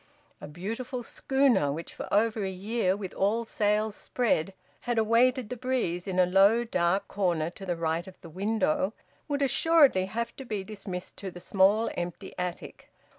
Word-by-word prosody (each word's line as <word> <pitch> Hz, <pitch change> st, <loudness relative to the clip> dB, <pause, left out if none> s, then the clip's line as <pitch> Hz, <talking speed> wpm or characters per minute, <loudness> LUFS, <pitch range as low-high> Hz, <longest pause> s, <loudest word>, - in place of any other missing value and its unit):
A -, -, -7 dB
beautiful 225 Hz, -, -5 dB
schooner, 255 Hz, -, +2 dB
which 160 Hz, +4 st, -6 dB
for -, -, -7 dB
over 215 Hz, +1 st, +2 dB
a 190 Hz, -, -1 dB
year, 195 Hz, +1 st, -1 dB
with 195 Hz, -3 st, -6 dB
all 220 Hz, +4 st, +1 dB
sails 210 Hz, 0 st, 0 dB
spread, 195 Hz, -7 st, 0 dB, 0.3 s
had 240 Hz, -, +1 dB
awaited 230 Hz, +2 st, +3 dB
the 250 Hz, -, -4 dB
breeze 230 Hz, -8 st, -2 dB
in 185 Hz, -1 st, -2 dB
a 185 Hz, -, +6 dB
low 195 Hz, +6 st, +4 dB
dark 190 Hz, -2 st, 0 dB
corner 170 Hz, -5 st, 0 dB
to 195 Hz, +1 st, -10 dB
the 175 Hz, -, 0 dB
right 165 Hz, +2 st, -2 dB
of 190 Hz, -, -13 dB
the 175 Hz, -, -10 dB
window, 225 Hz, -, 0 dB, 0.3 s
would 285 Hz, -1 st, 0 dB
assuredly 275 Hz, -, +4 dB
have 230 Hz, +4 st, -3 dB
to 270 Hz, -, -7 dB
be 215 Hz, -6 st, -4 dB
dismissed 190 Hz, -3 st, -7 dB
to 195 Hz, -, -5 dB
the 175 Hz, -, -10 dB
small, 200 Hz, +5 st, +3 dB
empty 175 Hz, -1 st, -5 dB
attic. 180 Hz, -1 st, -5 dB
205 Hz, 175 wpm, -28 LUFS, 180-235 Hz, 0.3 s, a